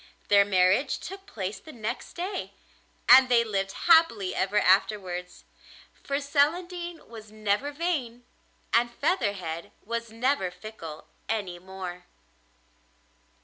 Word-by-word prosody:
Their 200 -1 +6
marriage 195 +7 +3
took 390 +1 -9
place 195 - -5
the 315 - -12
next 225 -5 -5
day, 370 +2 -4 0.5
and 255 +1 +8
they 235 -1 +5
lived 195 -3 -2
happily 320 - +5
ever 195 +2 0
afterwards, 185 -2 +1 0.5
for 280 0 -3
Celandine 345 +4 -1
was 220 -2 -11
never 215 +6 -1
vain 285 -7 -3 0.5
and 235 +1 +3
Featherhead 205 - -2
was 230 +1 -3
never 230 -4 0
fickle 180 -6 -9 0.2
any 195 -6 -2
more. 180 -1 -8
220 Hz, 110 wpm, -27 LUFS, 190-285 Hz, 0.5 s, and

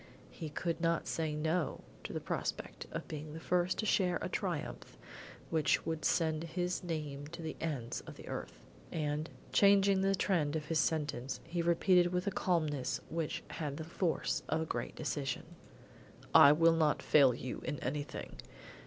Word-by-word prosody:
He 160 -3 -6
could 165 +2 -2
not 170 -1 +1
say 160 -2 -1
no 160 +1 0 0.2
to - - -4
the - - -2
prospect - - -4
of - - -5
being 150 0 -6
the - - -5
first 180 +2 +1
to 220 - -1
share 180 -4 +2
a - - -3
triumph - - -4 0.5
which 160 -3 +2
would 160 -2 -2
send 160 -2 +2
his 175 +2 -2
name 150 -4 -4
to 170 +2 -8
the 160 - -4
ends 140 -8 -3
of - - -8
the - - -11
earth; - - -6 0.3
and, 150 0 -2 0.2
changing 200 -1 +5
the 195 0 +3
trend 160 -7 +1
of 155 -1 -2
his 160 +1 +1
sentence, 145 -5 -1
he 170 +1 -2
repeated 175 +1 +4
with 180 0 0
a 200 - 0
calmness 150 -10 0
which 165 -2 -2
had 145 -3 -4
the 160 - -4
force 170 +1 -1
of 160 - +1
a - - -1
great - - -4
decision. 145 -4 -2 0.9
"I 140 - +10
will 165 +2 +5
not 155 -2 +2
fail 135 -5 +6
you 125 +1 -5
in 145 -2 -2
anything. 145 +3 -4
160 Hz, 170 wpm, -34 LUFS, 150-175 Hz, 0.9 s, I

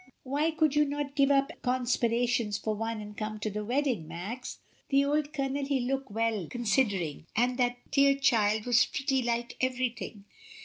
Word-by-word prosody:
Why 285 +4 0
could 310 -2 +2
you 300 - +5
not 290 -1 -3
give 275 -1 +4
up 275 +1 +3
conspirations 240 -3 +1
for 215 - -2
once 225 0 -3
and 210 0 -10
come 215 0 -4
to 215 - -2
the 210 +1 -3
wedding, 245 - 0
Max? 200 +10 -6 0.3
The 275 0 +4
old 295 +1 0
Colonel 275 -1 -2
he 275 -1 0
look 265 +1 -2
well 220 -4 -1
considering; 205 - 0
and 245 +3 +2
that 245 0 +1
dear 275 -1 +5
child 220 -6 +2
was 245 0 +5
pretty 270 -1 0
like 235 0 -2
everything. 250 -5 -2
245 Hz, 170 wpm, -29 LUFS, 220-275 Hz, 0.3 s, you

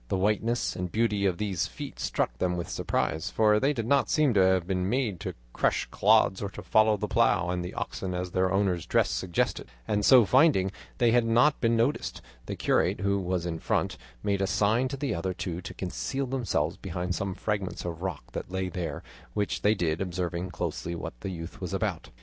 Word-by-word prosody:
The 95 - 0
whiteness 105 +5 0
and 90 -1 -4
beauty 105 -3 +1
of 90 -2 0
these 100 -4 -1
feet - - -8
struck - - -1
them 90 -1 0
with 85 - -4
surprise, 80 0 -1
for 105 -1 +3
they 135 +4 +2
did 115 -6 -2
not 140 +3 +2
seem 150 -5 +3
to 100 - +3
have 95 -2 +4
been 90 0 -1
made 115 -7 0
to - - -5 0.2
crush - - +1
clods 95 - +4
or 100 - -2
to - - -9
follow 110 -1 +4
the - - -3
plough 90 - +2
and 90 0 -2
the 90 - -6
oxen 90 -1 -3
as 90 0 -3
their 95 +1 +1
owner's 95 -3 +1
dress - - +2
suggested; 90 -2 -1 0.2
and 105 0 +1
so, 125 -2 +7
finding 125 - +4 0.3
they 120 -3 +4
had 120 0 +4
not 120 +6 +4
been 115 -1 +3
noticed, 120 +6 0 0.3
the - - -3
curate, - - +1
who 100 0 +1
was 90 -2 -1
in 85 -2 -3
front, - - 0 0.3
made 100 -1 0
a 95 - +1
sign 110 +6 +2
to 140 +1 -5
the 140 0 -1
other 90 +2 -2
two 85 -1 -4
to 90 - -7
conceal 135 +9 -3
themselves 115 - -1
behind 90 -1 -3
some 95 0 -3
fragments 100 -4 -3
of 85 -1 -5
rock 90 -6 -3
that - - -5
lay 95 0 -2
there; 85 -1 -4 0.3
which 105 -1 -1
they 105 +1 +4
did, 80 -4 -1
observing 90 -1 -2
closely 85 0 -4
what 85 - -5
the - - -4
youth 85 -3 -7
was - - -3
about. - - -2
95 Hz, 210 wpm, -28 LUFS, 90-110 Hz, 0.3 s, so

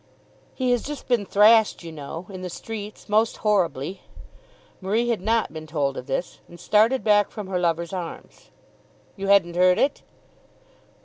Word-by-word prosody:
"He 255 -2 0
has 245 -2 +2
just 295 0 -7
been 235 -6 +1
thrashed, 215 0 +4
you 165 - -8
know, 160 +3 -8
in 185 -1 -8
the 180 - -5
streets, 210 +3 -8
most 220 +2 +2
horribly." 185 -4 0 0.8
Marie 220 +6 0
had 230 -5 0
not 225 -2 0
been 155 0 -8
told 145 -3 -1
of 125 - -7
this, 140 +6 -3
and 175 - -14
started 225 +5 +3
back 205 -1 +3
from 210 - -7
her 185 -1 -2
lover's 170 0 -1
arms. 175 -3 -8 0.7
"You 195 -1 -5
hadn't 185 -4 +4
heard 180 0 +4
it?" 280 +1 +1
195 Hz, 165 wpm, -24 LUFS, 170-220 Hz, 0.8 s, thrashed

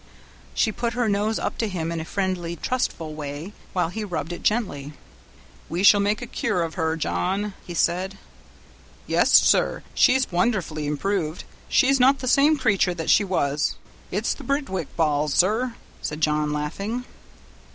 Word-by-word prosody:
She 220 - +2
put 235 +2 -2
her 245 -1 0
nose 210 +2 +1
up - - -3
to 225 - +1
him 170 -4 -3
in 170 - -3
a 160 - -5
friendly, 180 -3 -2
trustful 170 -9 -2
way, 150 +5 -6 0.2
while 180 -3 0
he 215 +5 -4
rubbed 175 -4 -4
it - - -7
gently. 155 - -1 0.8
"We 175 +3 -2
shall 205 +1 +7
make 205 +3 0
a - - -3
cure 180 -6 -1
of 165 -1 -4
her, 160 -2 -1
John," 165 - -1
he 175 - -6
said. 185 +4 0 0.9
"Yes, - - +2
sir, - - +4
she's 260 -2 +3
wonderfully 175 -5 0
improved; 160 +2 -2 0.3
she's 275 0 +4
not 265 +2 +5
the 255 - -5
same 290 +4 +4
creature 200 -8 +2
that 165 -2 0
she - - +5
was; 150 -6 0 0.3
it's - - 0
'the - - -11
Birtwick 275 - -2
balls', 150 -3 +1
sir," 230 +6 +2 0.3
said 150 - -4
John, 150 -1 +1
laughing. 195 +12 -3
185 Hz, 160 wpm, -24 LUFS, 160-220 Hz, 0.9 s, shall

